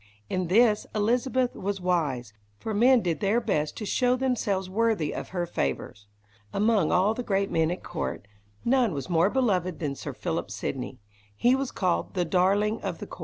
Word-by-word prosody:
In 185 -1 0
this 215 +3 +4
Elizabeth 245 +4 +1
was 195 +1 -3
wise, 150 -11 -1 0.2
for 220 - -4
men 245 +4 +5
did 170 -4 -1
their 210 +3 +2
best 155 -10 -1
to 215 - -4
show 250 +4 +2
themselves 225 -7 0
worthy 205 -5 0
of - - -5
her 175 -2 -2
favours. 105 - -3 0.4
Among 210 - +2
all 190 +4 +3
the 250 - -4
great 195 -4 0
men 160 -1 +2
at 180 - -4
court, 160 -11 -4 0.4
none 245 -5 +3
was 140 +6 -5
more 170 +3 +4
beloved 190 -9 +1
than 145 -4 -2
Sir 140 +1 -6
Philip 165 - -3
Sidney. 125 +5 -4 0.4
He 245 - +3
was 270 -1 -2
called 185 -1 -1
"the 180 -2 +1
darling 200 +5 +2
of - - -3
the - - -7
court". - - -11
195 Hz, 180 wpm, -27 LUFS, 165-230 Hz, 0.4 s, men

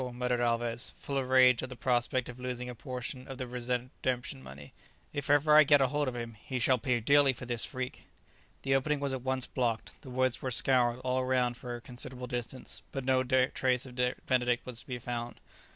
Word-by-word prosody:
muttered 125 0 0
Alvez, 120 0 0
full 140 - -5
of 130 -2 -1
rage 130 -2 +6
at 130 - -5
the 130 - -7
prospect 120 0 0
of 125 0 -9
losing 125 -1 -4
a 125 - -5
portion 125 +2 -6
of 135 - -7
the 130 - -3
redemption 125 - -3
money; 70 +2 -11 0.4
"if 140 -1 -3
ever 145 +1 +5
I 155 - +10
get 145 0 +5
hold 145 +2 +1
of 125 - -2
him, 115 -1 -5
he 130 - -3
shall 125 +1 +3
pay 125 +1 +1
dearly 140 +3 +5
for 125 - -8
this 120 -2 -1
freak." 130 0 -5 0.6
The 135 - +1
opening 145 +2 +1
was 140 -1 -1
at 130 - -3
once 130 0 0
blocked 120 -3 -1
up, - - -22
the 130 - -11
woods 130 -1 0
were 130 - -2
scoured 125 -1 +3
all 130 0 0
round 125 -1 +1
for 120 0 -6
a 120 - -8
considerable 125 +1 -6
distance, 125 +1 -5
but 135 -2 -4
no 130 -1 +3
trace 130 0 +2
of 125 -1 -10 0.3
Benedict 125 -1 +1
was 125 -2 -6
to - - -10
be 125 - -3
found. 120 0 -5
125 Hz, 215 wpm, -31 LUFS, 120-130 Hz, 0.6 s, I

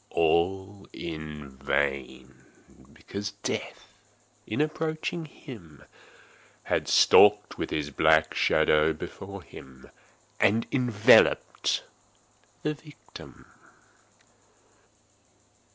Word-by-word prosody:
All 95 +5 0
in 75 -3 -7
vain; 65 -1 -3 0.5
because 100 0 -7
Death, - - -5 0.5
in 110 - -3
approaching 155 +2 -2
him 90 - -13 0.8
had - - -1
stalked 105 0 +5
with - - -3
his 75 -1 -3
black 80 +2 +3
shadow 75 +1 +2
before 95 +4 -9
him, 65 -4 -14 0.5
and 110 +3 +2
enveloped 120 -6 +3 0.8
the 150 - -1
victim. 150 0 -15
85 Hz, 75 wpm, -27 LUFS, 75-110 Hz, 0.8 s, stalked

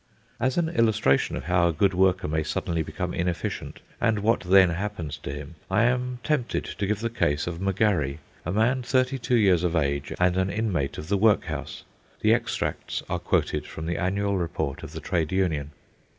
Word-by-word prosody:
As 130 0 0
an 170 -2 +2
illustration 110 - +2
of - - -5
how 90 0 +3
a - - +2
good 95 +5 +2
worker 95 -1 +2
may 80 +1 0
suddenly 80 +2 -2
become 90 +3 -4
inefficient, 90 0 -3 0.2
and 110 -3 +2
what 115 +2 +3
then 95 0 +5
happens 85 -5 -4
to 70 - -6
him, 75 +3 -7 0.2
I 100 +4 +3
am 125 +1 +1
tempted 145 -6 0
to 100 - -3
give 105 +1 -1
the 115 - -1
case 75 -10 0
of 85 0 -5
M'Garry, 95 -8 +1 0.3
a 90 - -3
man 115 +6 +2
thirty 130 +2 +1
two 125 +1 +1
years 95 -7 +4
of 90 -1 0
age, 70 -2 0
and 90 0 +3
an 95 0 +1
inmate 95 -10 -1
of 75 - -6
the 100 +2 +1
workhouse. 105 +1 +1 0.4
The - - +5
extracts - - -2
are - - 0
quoted - - 0
from 80 - -7
the 85 +1 -2
annual 100 +1 0
report 85 -5 -3
of - - -9
the - - -6
trade 85 -5 -1
union. 85 -7 0
95 Hz, 195 wpm, -26 LUFS, 80-110 Hz, 0.4 s, then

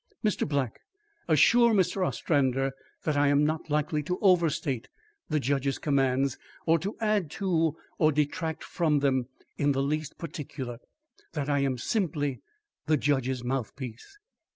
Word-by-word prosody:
Mr. 210 - +1
Black, 140 -5 -1 0.5
assure 230 - +5
Mr. 185 0 +2
Ostrander 135 -6 +1 0.3
that 155 - 0
I 145 0 +4
am 145 +1 +4
not 155 +1 -2
likely 150 +1 +1
to 180 +5 -2
overstate 165 - +2 0.4
the 155 -1 +1
judge's 140 0 0
commands, 135 -2 +1 0.3
or 165 0 +4
to 195 +7 -4
add 210 -7 +1
to 165 -5 +1 0.2
or 155 0 +5
detract 160 +2 -1
from 160 -4 +1
them 130 -3 +1 0.3
in 145 0 +3
the 135 0 0
least 155 +2 -2
particular 135 -6 -6 0.5
that 150 -3 -2
I 140 - +2
am 135 -2 0
simply 145 - -1 0.5
the 155 0 +4
judge's 130 -3 0
mouthpiece." 125 - -5
145 Hz, 140 wpm, -28 LUFS, 135-165 Hz, 0.5 s, assure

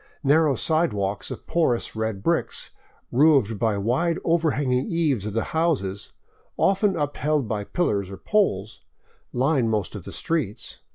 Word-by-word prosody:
Narrow 145 0 +4
sidewalks 105 - 0
of - - -8
porous 140 -11 0
red 110 -3 -3
bricks, - - -1 0.4
roofed 130 -6 +4
by 110 0 +2
the 100 - -2
wide 150 - +1
overhanging 145 - +1
eaves 150 - 0
of 105 - -4
the 115 - 0
houses, 130 - -1 0.5
often 195 0 +2
upheld 145 -3 -1
by 105 -2 -3
pillars 100 - -1
or 95 - -8
poles, 110 - 0 0.5
line 130 -2 +1
most 105 -4 -1
of 105 -4 -7
the - - -7
streets. 155 - -3
130 Hz, 140 wpm, -24 LUFS, 105-160 Hz, 0.5 s, Narrow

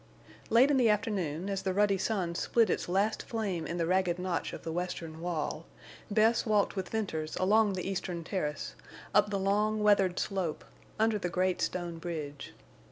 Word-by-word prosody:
Late 250 +5 +6
in 280 - +3
the 240 -3 +4
afternoon, 195 -6 0
as 195 -1 -2
the 190 -1 -2
ruddy 200 -1 +3
sun 190 -4 -1
split 220 +3 +2
its - - -2
last 200 +4 +1
flame 200 -8 -3
in 170 - -3
the 170 - +1
ragged 180 0 +1
notch 180 -2 -2
of - - -8
the 165 - -4
western 165 -2 -4
wall, 165 -2 -3 0.4
Bess 220 +2 +3
walked 210 -3 +2
with 190 -2 -3
Venters 160 -8 -3
along 205 +2 +3
the 185 -1 -3
eastern 180 -3 -3
terrace, 155 -4 -3 0.4
up 210 +1 +4
the 200 - -1
long, 210 +2 +1
weathered 195 -3 +4
slope, 185 -6 -2 0.3
under 220 0 +2
the 175 - -2
great 185 +1 0
stone 175 -2 -2
bridge. 150 -5 -6
190 Hz, 175 wpm, -31 LUFS, 170-210 Hz, 0.4 s, Late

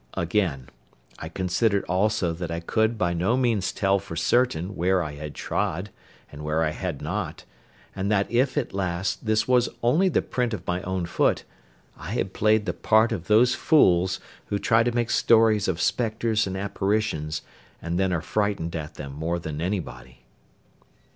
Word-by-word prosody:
Again, 85 -7 -1 0.5
I 80 - -6
considered 95 +4 0
also 95 -1 +1
that 85 0 -5
I 85 0 -3
could 110 +6 0
by 85 -4 0
no 90 +9 +1
means 115 -7 +1
tell 100 0 +1
for 95 -3 -8
certain 95 0 +1
where 90 +1 +2
I 75 - -5
had 75 0 -8
trod, 90 +6 -2 0.4
and 75 +1 -9
where 75 +2 0
I 75 - 0
had 85 -3 -5
not; - - -4 0.5
and 100 +2 -1
that 100 -1 +3
if, 130 +4 +1
at 140 - -1
last, 95 +2 -2
this 110 0 +2
was 125 -1 +3
only 160 +11 +3
the - - +1
print 120 -3 -1
of 90 -3 -10
my 90 +1 -1
own 95 -1 -2
foot, - - +1 0.6
I 95 - -6
had 95 -5 -2
played 110 0 +2
the - - -1
part 110 +2 +3
of 95 -6 -4
those 120 +4 +5
fools 95 - +3 0.3
who 100 - -1
try 115 +3 +3
to 120 +1 +1
make 120 -1 -1
stories 110 -2 +4
of 90 -2 -1
spectres 110 +1 0
and 95 0 -4
apparitions, 100 -5 -1 0.4
and 85 +2 -3
then 95 -1 +1
are 85 -3 0
frightened 100 -3 -1
at 75 -2 -6
them 70 -2 -7
more 80 +4 -2
than 80 -2 -5
anybody. 65 -10 -5
95 Hz, 175 wpm, -25 LUFS, 85-110 Hz, 0.6 s, those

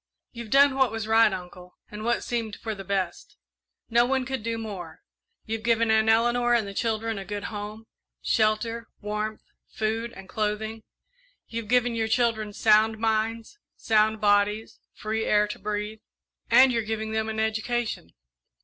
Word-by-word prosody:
"You've 235 -2 -8
done 280 +3 +6
what 265 -3 +2
was 225 -1 -3
right, 220 0 +5
Uncle, 180 -1 -9
and 210 +1 -7
what 235 +1 0
seemed 230 -3 -3
for 220 - -5
the 195 -2 -8
best 190 -2 -3 0.5
no 235 +1 +4
one 260 +1 0
could 265 -1 -3
do 230 +1 -2
more. 190 -8 -7 0.4
You've 225 0 -3
given 230 0 +2
Aunt 220 0 +3
Eleanor 240 +2 +3
and 220 -4 +1
the 200 - -7
children 225 0 -1
a - - -5
good 205 +1 -5
home 210 +2 -6 0.3
shelter, 225 +1 0
warmth, 210 +1 -4 0.2
food, 225 +2 -2
and 195 0 -11
clothing. 215 +1 -2 0.7
You've 230 -1 -5
given 245 0 +2
your 225 -1 0
children 225 -2 +1
sound 220 +1 +3
minds, 225 - -1 0.2
sound 220 0 +2
bodies, 205 +1 +1 0.2
free 220 +1 -2
air 210 0 +3
to 210 - -7
breathe, 210 +1 -4 0.5
and 255 +3 +7
you're 230 -1 +1
giving 220 0 -3
them 220 0 -1
an 220 0 -3
education. 220 - -2
220 Hz, 160 wpm, -26 LUFS, 210-230 Hz, 0.7 s, and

